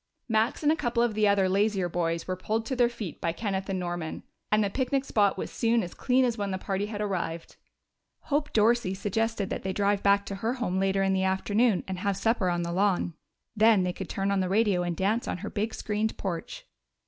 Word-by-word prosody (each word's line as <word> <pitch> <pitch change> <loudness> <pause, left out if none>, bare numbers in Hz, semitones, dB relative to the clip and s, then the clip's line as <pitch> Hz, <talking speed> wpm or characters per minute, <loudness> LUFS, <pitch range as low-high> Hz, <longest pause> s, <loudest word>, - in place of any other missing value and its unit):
Max 225 +5 +1
and 300 - +4
a - - +3
couple 240 -5 0
of 240 -2 +1
the 210 0 +2
other 200 -2 +3
lazier 195 -1 +1
boys 170 -1 -2
were 185 - -1
pulled 220 +4 -2
to 260 - -2
their 245 -1 +3
feet 220 -9 -7
by 165 - 0
Kenneth 195 +1 -3
and 190 - -1
Norman, 175 -3 -4 0.3
and 210 0 +4
the 200 - 0
picnic 265 +2 0
spot 205 -6 +2
was - - -4
soon 230 -1 +1
as 175 - -7
clean 255 0 +2
as 235 -2 -1
when 200 -1 -1
the 190 - -2
party 195 +1 -2
had 210 -1 -5
arrived. 175 -5 -3 0.7
Hope 295 +1 -1
Dorsey 220 -3 +2
suggested 210 +1 -1
that - - -2
they 190 0 -3
drive 200 0 +1
back 200 0 +3
to 200 - -5
her 230 +2 0
home 215 -8 -1
later 195 0 +1
in 195 0 +2
the 190 - +1
afternoon 200 +3 +2
and 190 -1 -4
have 195 0 -1
supper 225 -5 +1
on 175 0 0
the 170 - -3
lawn. 185 -2 +1 0.4
Then 215 -2 +5
they 180 0 -1
could 190 0 -7
turn 195 0 -1
on 200 - +1
the 185 -1 0
radio 200 -2 +2
and 175 -2 -2
dance 215 +5 0
on - - -2
her - - -5
big 215 +2 -1
screened 215 +1 -2
porch. 190 - -5
200 Hz, 230 wpm, -28 LUFS, 190-225 Hz, 0.7 s, Then